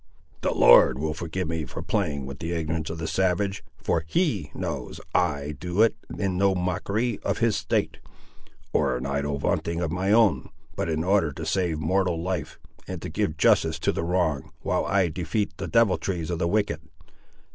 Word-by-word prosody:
The - - +1
Lord 65 +1 +6
will 75 +2 -1
forgive 85 +2 -4
me 80 -1 -2
for 70 - -7
playing 75 -10 -1
with 70 +1 -8
the 85 +1 -3
ignorance 80 -1 -2
of 80 - -5
the 80 - -4
savage, 95 +4 0
for 80 - 0
He 110 - 0
knows - - -4
I 70 +1 0
do 90 +4 +2
it 115 - +3 0.2
in 95 -2 -1
no 100 -1 +3
mockery 100 +6 -1
of - - -1
his - - +2
state, - - -1 0.7
or 65 - +2
in 65 - -5
idle 70 +1 -1
vaunting 85 +4 -1
of 85 -3 -1
my 95 +3 0
own; 105 - +4 0.3
but - - -2
in 80 0 0
order 95 -4 +2
to - - -6
save 90 -5 0
mortal 90 +2 +1
life, 85 -3 -3 0.3
and - - -5
to - - -4
give 80 - -1
justice 80 0 +3
to 80 - +1
the - - -3
wronged, 85 -5 0
while - - 0
I 95 -2 +2
defeat 90 +6 -2
the - - -4
deviltries 95 -6 +1
of 85 - -2
the 85 - +1
wicked! 100 -5 0
85 Hz, 185 wpm, -26 LUFS, 80-95 Hz, 0.7 s, Lord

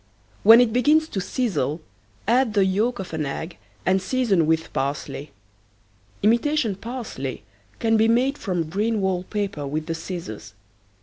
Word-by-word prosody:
When 225 +3 +9
it 240 -3 +3
begins 300 +6 +4
to 195 - -2
sizzle 180 - -1 0.5
add 240 -1 +2
the 200 -2 +4
yolk 215 +6 +1
of 185 -4 -7
an 160 -1 -1
egg 160 +5 -5 0.3
and 190 0 +3
season 195 -6 +1
with 160 0 0
parsley. 140 +1 -3 0.9
Imitation 235 +2 +2
parsley 215 - -6 0.3
can 225 -1 +2
be 220 +1 +4
made 250 +5 +2
from 175 -5 -2
green 210 +6 0
wall 190 -2 0
paper 195 -7 -3
with 155 +2 -3
the 165 - -2
scissors. 160 - -7
195 Hz, 145 wpm, -23 LUFS, 160-230 Hz, 0.9 s, When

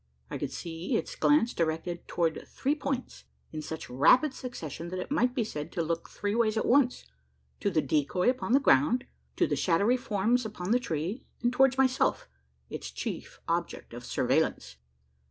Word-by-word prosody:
I - - -3
could - - -3
see 170 +7 -3
its - - -4
glance 290 -5 +3
directed 165 +1 -2
towards 165 -2 -1
three 275 +2 0
points 275 -4 -4 0.3
in 155 - -5
such 160 +1 -6
rapid 250 - +4
succession, 170 - -6
that 185 - -4
it 185 - -5
might 250 -4 +2
be 245 - +1
said 150 -8 -5
to 170 - 0
look 165 +1 -3
"three 205 +1 -2
ways 225 -1 +2
at - - +1
once" 250 0 +3 0.5
to 205 - +1
the 160 -5 +1
decoy 150 +6 +1
upon 250 -1 +1
the 275 - +7
ground, 240 - +3 0.3
to - - +3
the - - 0
shadowy 200 +8 +2
forms 235 0 +1
upon 210 -3 -4
the 245 - +4
tree, 190 - -3 0.2
and 240 +1 +2
towards 265 +1 +4
myself 265 -1 +2 0.4
its - - -6
chief - - -6
object - - -2
of - - -8
surveillance! 60 - 0
210 Hz, 175 wpm, -29 LUFS, 165-250 Hz, 0.5 s, the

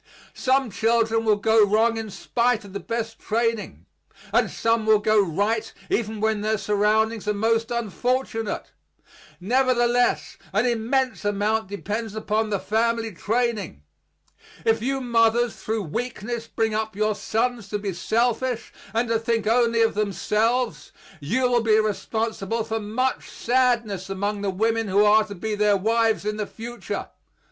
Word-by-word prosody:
Some 265 -2 +1
children 225 +1 +1
will 215 -1 +4
go 220 +1 +4
wrong 220 +3 +3
in 225 -1 -4
spite 235 +2 0
of 195 - -12
the 200 - -3
best 225 0 -4
training; 230 0 -2 0.5
and - - +3
some 230 -1 0
will 215 0 +6
go 210 0 +3
right 205 +6 -1 0.2
even 220 -1 -1
when 220 -1 0
their 215 +1 0
surroundings 215 +2 +1
are 210 - +1
most 225 +2 +1
unfortunate; 235 0 -2 0.7
nevertheless 245 +3 +1 0.2
an - - +2
immense 250 +2 0
amount 205 +1 0
depends 210 +2 -4
upon 215 0 -1
the 205 - 0
family 225 +2 0
training. 215 - -2 0.8
If 225 0 +2
you 270 +3 -1
mothers 235 -1 +2
through 220 -1 -2
weakness 230 +5 -4
bring 220 -1 -1
up 220 -1 -2
your 215 +1 +1
sons 230 0 -2
to 210 - -1
be 200 -2 -4
selfish 235 +5 -1 0.2
and 235 +2 +1
to 225 0 +1
think 225 -1 -1
only 230 0 +3
of 225 - +2
themselves, 210 -1 0 0.3
you 210 - -1
will 245 -1 +3
be 220 -1 +4
responsible 220 +1 -2
for 225 0 -3
much 235 +5 -2
sadness 235 -6 0
among 200 +1 -2
the 200 - -1
women 225 +3 0
who 200 +2 +4
are 215 +1 +5
to 205 -2 -8
be 215 +4 -3
their 210 -1 +3
wives 225 +1 +1
in 210 0 -2
the 210 -1 -3
future. 235 +1 -6
220 Hz, 150 wpm, -24 LUFS, 210-235 Hz, 0.8 s, will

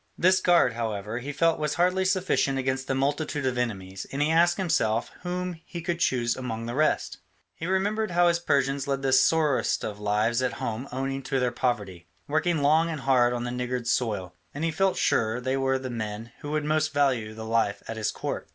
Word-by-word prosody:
This 185 +1 +4
guard, 170 -10 +4
however, 110 -1 -3
he 135 +4 -5
felt 165 +3 +2
was 150 -1 -1
hardly 180 +2 +2
sufficient 185 -7 +1
against 130 0 -1
the 135 - 0
multitude 145 +1 -1
of 130 -1 0
enemies, 95 -6 -3
and 135 - -4
he 150 +2 +2
asked 170 +2 +4
himself 120 - 0
whom 180 -1 -4
he 170 - -7
could 170 0 -2
choose 120 -6 +1
among 115 -3 -4
the 120 - -4
rest. 155 +4 +1 0.4
He 165 - -6
remembered 205 +4 0
how 175 0 +3
his 170 0 +2
Persians 140 -3 0
led 135 -1 -1
the 135 -1 +2
sorriest 150 +1 +3
of 105 -1 -5
lives 105 +4 +1
at 130 - 0
home 115 +4 -4
owing 135 +1 -3
to 135 0 -1
their 125 -1 +1
poverty, 100 -9 -2 0.2
working 155 +1 +1
long 160 +3 +4
and 155 -4 -4
hard 125 -3 +3
on 120 -1 -2
the 120 - -3
niggard 125 0 -3
soil, 105 -7 -1 0.2
and 145 - -3
he 165 - +1
felt 195 +4 +1
sure 110 +1 +1
they 130 +2 -1
were 135 0 +1
the 130 -1 -5
men 110 0 -5
who 145 - -7
would 150 0 -1
most 155 0 +1
value 125 -7 +1
the 110 0 -7
life 110 -3 0
at 115 - -4
his 110 -1 -1
court. - - -5
135 Hz, 210 wpm, -26 LUFS, 120-160 Hz, 0.4 s, This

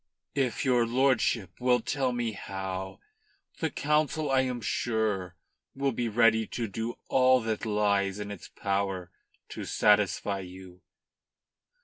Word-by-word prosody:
"If 130 -3 0
your 120 -3 +3
lordship 120 -7 +1
will 125 0 +3
tell 135 -4 -1
me 120 -2 -1
how, 95 -2 -5 0.6
the 160 - 0
Council, 150 0 0
I 130 -1 +4
am 125 -2 -2
sure, 110 -6 -1 0.4
will 135 0 0
be 120 -1 -2
ready 110 0 +4
to 115 -2 -3
do 115 +4 -4
all 130 0 +5
that 110 0 -2
lies 100 -2 +1
in 105 0 -5
its 100 - -8
power 95 -3 -2 0.4
to - - -6
satisfy 105 -1 +2
you." 90 -1 -11
110 Hz, 130 wpm, -29 LUFS, 100-125 Hz, 0.6 s, all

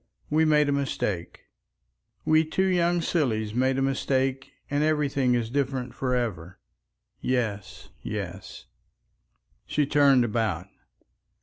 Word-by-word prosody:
We 160 +1 +4
made 150 -1 +4
a - - +1
mistake. 105 -10 -2 0.8
We 155 0 +4
two 175 +4 0
young 175 -2 +2
sillies 110 - 0
made 130 +2 +1
a 135 - +1
mistake 135 0 -1 0.2
and 145 +1 0
everything 140 -5 +1
is 115 -1 -2
different 130 -2 -2
for 125 -1 -1
ever. 95 -8 -3 0.6
Yes, 110 -6 -3
yes." - - -6 1.0
She 150 - +1
turned 140 -3 +4
about. 110 -6 -2
135 Hz, 115 wpm, -26 LUFS, 120-150 Hz, 1.0 s, We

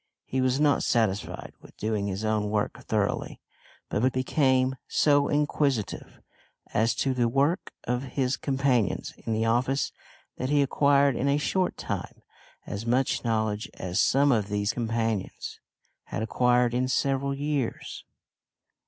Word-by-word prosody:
He 130 - -1
was 130 +1 +1
not 150 -1 +3
satisfied 110 -4 -1
with - - -17
doing 105 -2 -1
his 100 +2 -3
own 105 -1 0
work 105 -1 -2
thoroughly, - - -1 0.5
but 125 +6 +1
became 130 0 +2
so 145 -1 +3
inquisitive 145 -7 -1 0.5
as 115 +2 +2
to 135 - 0
the 120 -2 +1
work 140 - +1
of 125 +2 -2
his 130 -1 +2
companions 135 -5 0
in - - -6
the 110 +1 +1
office 125 +4 +1 0.5
that 130 - -2
he 145 -1 +4
acquired 140 0 +3
in 135 - 0
a 140 +1 +3
short 180 +5 0
time - - -5 0.4
as 100 +2 -5
much 125 +3 +1
knowledge 110 -2 -1
as 90 -1 -2
some 140 +2 +4
of 110 -5 +1
these 105 +1 -1
companions 115 -3 -2 0.5
had - - -4
acquired 125 +1 +2
in 125 +1 +1
several 140 +1 0
years. 145 -3 -3
125 Hz, 140 wpm, -27 LUFS, 110-140 Hz, 0.5 s, he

